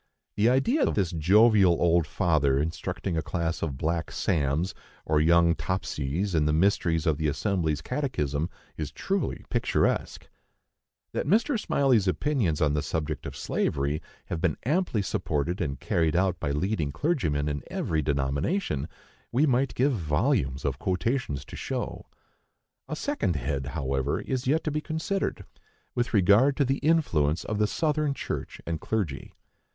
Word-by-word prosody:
The 105 +3 +4
idea 230 - +2
of - - +1
this 95 -5 +1
jovial 95 +2 +5
old 85 -2 +3
father 75 -7 +2
instructing 85 +4 -3
a 80 - +1
class 85 0 -2
of 70 -5 -2
black 85 +4 -1
"Sams" 80 +2 0 0.3
and 75 -1 +2
young 85 +1 +5
"Topsys" 85 +1 -2
in 80 -2 +2
the 75 - +2
mysteries 80 -2 +2
of 80 -2 +1
the 80 - +1
Assembly's 80 -2 0
Catechism 80 - -1 0.3
is 75 -3 -4
truly 195 0 -2
picturesque! - - 0 0.9
That - - -2
Mr. 235 +6 +3
Smylie's 135 - +2
opinions 100 - 0
on 75 -2 +3
the 75 - +1
subject 75 -1 -3
of - - -7
slavery 70 +2 -1 0.2
have 85 -3 -4
been 85 -5 +1
amply 150 - +1
supported 85 -3 -1
and 70 -5 -2
carried 80 -2 +1
out 90 -1 +1
by - - -2
leading 75 +1 -1
clergymen 80 - 0
in 70 -1 -2
every 80 -1 -1
denomination, 70 - -1 0.4
we 135 +6 +3
might 135 -1 +1
give 135 +3 +2
volumes 80 - 0
of 70 -1 -1
quotations 90 - -1
to - - -10
show. - - -4 0.8
A 155 - -3
second 220 - -1
head, 70 0 -2
however, 70 -1 -1
is 130 -1 -3
yet 155 +4 +2
to 155 - -1
be 150 +1 -1
considered, 160 +6 -2 0.5
with 120 0 -1
regard 105 +7 +4
to 140 - +3
the 135 +2 0
influence 85 - +2
of 105 -1 -3
the 105 - +3
Southern 150 +1 0
church - - -5
and 80 -2 -3
clergy. 95 -11 -3
85 Hz, 155 wpm, -27 LUFS, 75-120 Hz, 0.9 s, jovial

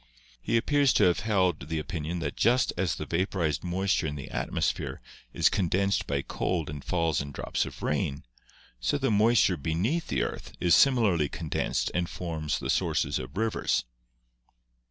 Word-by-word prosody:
He 115 - +1
appears 140 +3 +3
to - - +4
have 90 -1 +4
held 95 -9 0
the 80 - -1
opinion 80 +2 -4
that 70 -3 -3
just 120 +3 +3
as 85 -5 0
the - - -5
vapor 95 +1 -1
ized 75 -2 0
moisture 90 -1 0
in 75 - -4
the 70 -2 -8
atmosphere - - -2 0.3
is - - +3
condensed 95 +1 +1
by 70 -1 -1
cold 85 -5 -2
and 75 -1 -7
falls 80 -5 0
in 70 0 -7
drops - - -2
of - - -10
rain, 70 - -1 0.6
so - - 0
the 135 -4 0
moisture 105 -3 +4
beneath 90 - -1
the 65 -4 0
earth - - -6
is 85 - +3
similarly 105 - +4
condensed 80 -3 -2
and 85 0 -1
forms 80 -4 -3
the - - -2
sources - - 0
of 65 +6 -8
rivers. 110 - 0
85 Hz, 170 wpm, -28 LUFS, 75-100 Hz, 0.6 s, to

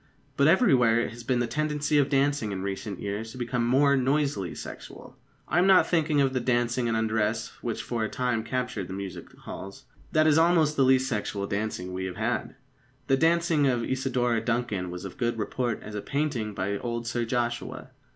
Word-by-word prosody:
But 140 - +4
everywhere 130 - +4
it - - -1
has 120 0 -10
been 125 +1 +1
the 120 - +1
tendency 150 +3 0
of 140 0 +2
dancing 140 -5 +1
in 95 -1 -4
recent 100 0 -4
years 105 +3 -4
to - - -10
become 120 -1 -1
more 140 +3 +4
noisily 135 - 0
sexual. - - -10 0.3
I - - +2
am 185 - +4
not 190 -1 +6
thinking 155 -3 +1
of 135 -1 +2
the 130 - +1
dancing 120 0 +1
in 115 - 0
undress 110 0 0
which 115 -1 -3
for 115 -1 -2
a 110 - -1
time 125 -3 -1
captured 125 -5 -3
the 95 - -6
music 100 -1 -7
halls. 95 +1 -9 0.3
That 155 0 +3
is 155 0 +5
almost 165 -3 +3
the 140 - +1
least 130 0 +4
sexual 105 -4 -2
dancing 100 -3 -3
we 95 0 -3
have 90 -1 -5
had. 120 +4 -2 0.5
The 135 - +3
dancing 165 -2 +3
of 120 -3 +1
Isidora 125 -3 0
Duncan 115 -6 -1
was 90 +2 -7
of 95 - -5
as - - -20
good 120 -1 0
report 115 +1 -2
as 105 - -8
a 105 - -3
painting 135 -8 -2
by 100 +1 -2
old 120 -1 -3
Sir 120 +1 -1
Joshua. 120 0 -3
120 Hz, 200 wpm, -27 LUFS, 110-140 Hz, 0.5 s, not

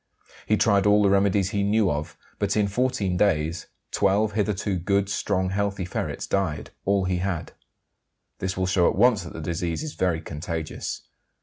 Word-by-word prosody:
He 105 - +3
tried 100 -3 +3
all 105 0 +5
the 100 - +4
remedies 100 0 +2
he 100 - 0
knew 105 0 +2
of, 75 +1 -4 0.2
but - - 0
in 105 -1 +3
14 100 -4 0
days 85 -4 +1 0.2
12 100 +2 +2
hitherto 105 -2 -1
good, 100 +2 +1
strong, 95 -2 0
healthy 100 -1 -1
ferrets 90 - -3
died: 95 -6 -1
all 100 -1 +2
he 90 -1 0
had. 90 -2 -3 0.9
This 95 0 -3
will 95 - +1
show 90 -1 +3
at - - -2
once 115 -2 +4
that 85 - -9
the - - -7
disease 85 - -2
is 155 - -5
very 90 -3 0
contagious. 80 0 -5
95 Hz, 175 wpm, -25 LUFS, 90-100 Hz, 0.9 s, all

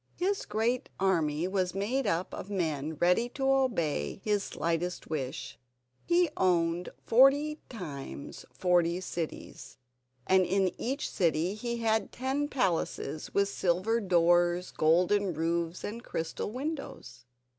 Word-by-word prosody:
His 390 +3 -1
great 235 +4 0
army 165 -4 +1
was 185 -1 -1
made 230 +6 0
up 180 -1 -1
of 195 - -6
men 160 -6 -2
ready 180 +9 +2
to 270 -1 0
obey 220 - +1
his 205 -2 +1
slightest 170 +1 -2
wish; 135 -4 -4 0.4
he 350 0 +3
owned 175 -1 +1 0.2
forty 285 +5 +5
times 145 - -7
forty 175 -1 +2
cities, 170 -3 -6 0.5
and 190 0 +4
in 190 +1 +1
each 270 +5 -2
city 170 +1 +1
he 235 +2 -3
had 220 -1 0
ten 270 +3 -1
palaces 170 - -1
with 200 0 +3
silver 195 +4 +1
doors, 175 -1 +3
golden 180 +4 +2
roofs, 165 +2 -1
and 230 +3 -5
crystal 165 -3 -3
windows. 250 - -6
185 Hz, 125 wpm, -30 LUFS, 170-235 Hz, 0.5 s, forty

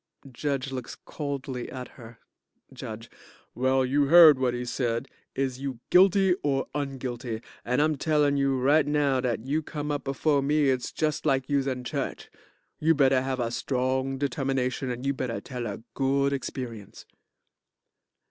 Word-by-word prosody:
JUDGE 135 +1 -2
looks 130 -3 -6
coldly 140 -4 -5
at 125 -1 -7
her.) 115 -1 -13 1.4
Well, 130 +1 +2
you 140 +3 +2
heard 160 -1 +8
whut 125 -2 +1
he 125 0 -4
said. 120 0 -2 0.3
Is 130 -1 -2
you 135 -4 -4
guilty 190 0 +5
or 135 -2 0
unguilty? 130 -5 -4 0.2
And 125 +5 +1
I'm 155 -1 +1
tellin' 150 -2 +2
you 135 -1 +1
right 145 +4 +3
now 145 -3 +2
dat 120 -3 -1
you 150 +4 0
come 150 -1 -5
up 145 -2 -3
befo' 140 +1 +1
me 145 0 +2
it's 125 -2 -2
just 155 0 -1
like 135 -2 +1
youse 140 -1 +1
in 130 -2 -2
church. 140 +1 -4 0.5
You 160 +1 +3
better 135 -2 +4
have 130 0 -2
a 115 -1 -1
strong 130 +1 -1
determination, 135 -2 -1
and 125 +2 -4
you 140 - +1
better 130 -3 -3
tell 125 -3 -6
a 105 +2 -6
good 140 +1 +1
experience. 120 -6 -6
135 Hz, 155 wpm, -27 LUFS, 125-145 Hz, 1.4 s, heard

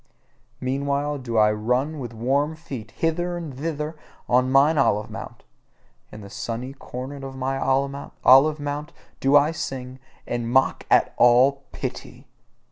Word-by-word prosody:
Meanwhile 140 +2 -1
do 120 -3 -3
I 105 0 +5
run 125 +8 -1
with 120 -3 -6
warm 135 +7 0
feet 135 -9 -8
hither 175 +5 -1
and 160 -6 -7
thither 150 +2 -4 0.3
on 125 +1 +3
mine 145 +3 +4
olive 105 -5 +1
mount: - - -9 0.7
in 105 - -10
the 100 - -10
sunny 115 +5 -5
corner 135 +1 -8
of 135 0 -7
mine 135 +1 -2
olive 140 +2 +3
mount 145 +2 -4 0.3
do 135 +2 +3
I 145 +2 +3
sing, 130 -4 -6 0.3
and 120 -1 -3
mock 130 +2 +2
at - - +4
all 130 +3 +4
pity. - - -7
135 Hz, 140 wpm, -24 LUFS, 125-145 Hz, 0.7 s, I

